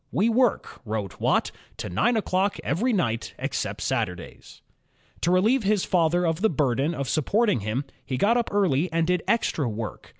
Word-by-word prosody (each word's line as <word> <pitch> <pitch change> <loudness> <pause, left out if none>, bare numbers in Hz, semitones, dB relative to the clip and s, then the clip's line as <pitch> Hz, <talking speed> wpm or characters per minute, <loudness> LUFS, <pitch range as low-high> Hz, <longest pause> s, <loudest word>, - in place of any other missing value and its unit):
"We 215 +5 +2
work," 240 0 +1
wrote 105 -8 -4
Watt, - - +2 0.3
"to - - -5
nine 225 - +1
o'clock 195 -1 0
every 205 - 0
night, 115 - -1
except - - -3
Satur 90 - -1
days." 85 - -13 0.6
To 170 - +1
relieve 215 +9 +3
his 205 -1 +1
father 175 0 +2
of 165 +1 -1
the 220 - +4
burden 145 +1 0
of 140 -2 -3
supporting 205 - +1
him, 110 +7 -2 0.2
he 130 - -3
got 210 - +3
up 240 -1 0
early 180 -5 +1
and 165 0 +1
did 180 0 +1
extra 175 - +1
work. 110 0 -6
170 Hz, 175 wpm, -25 LUFS, 130-205 Hz, 0.6 s, the